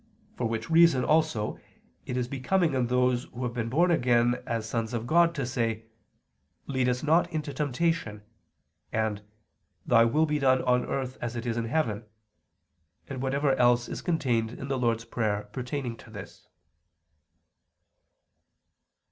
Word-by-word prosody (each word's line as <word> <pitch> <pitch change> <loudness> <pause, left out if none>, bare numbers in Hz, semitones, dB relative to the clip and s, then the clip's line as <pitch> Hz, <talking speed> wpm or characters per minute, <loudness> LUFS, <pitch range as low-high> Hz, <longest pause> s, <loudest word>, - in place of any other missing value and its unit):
For 120 - -1
which 115 0 -3
reason 165 -6 +5
also 155 -9 +1 0.5
it 125 - -2
is 125 -1 -1
becoming 155 +6 0
in 130 -2 +1
those 125 0 +1
who 125 - -8
have 120 -1 -2
been 115 -1 -3
born 170 +8 +3
again 120 -4 +2
as 115 -2 -2
sons 115 +1 -2
of 115 0 -3
God, 170 +4 +3
to 140 -4 -2
say: 115 -3 -2 0.8
"Lead 130 -2 0
us 125 0 -1
not 165 +3 +3
into 155 -3 -3
temptation," 145 -6 -1 0.7
and 110 -2 -1 0.6
"Thy 115 -1 +5
Will 150 +7 +2
be 150 -1 -1
done 130 -2 +3
on 125 -1 +2
earth 130 -1 -3
as 120 0 -4
it 120 0 -4
is 115 -2 -1
in 115 -1 -1
heaven," 115 -5 -1 1.0
and 130 -2 -5
whatever 135 +1 +1
else 120 0 +3
is - - -6
contained 125 -10 0
in 135 +2 -7
the 135 -1 -1
Lord's 115 -2 0
Prayer 105 -4 -1
pertaining 125 -1 -4
to - - -15
this. 100 -3 -11
125 Hz, 155 wpm, -28 LUFS, 115-145 Hz, 1.0 s, reason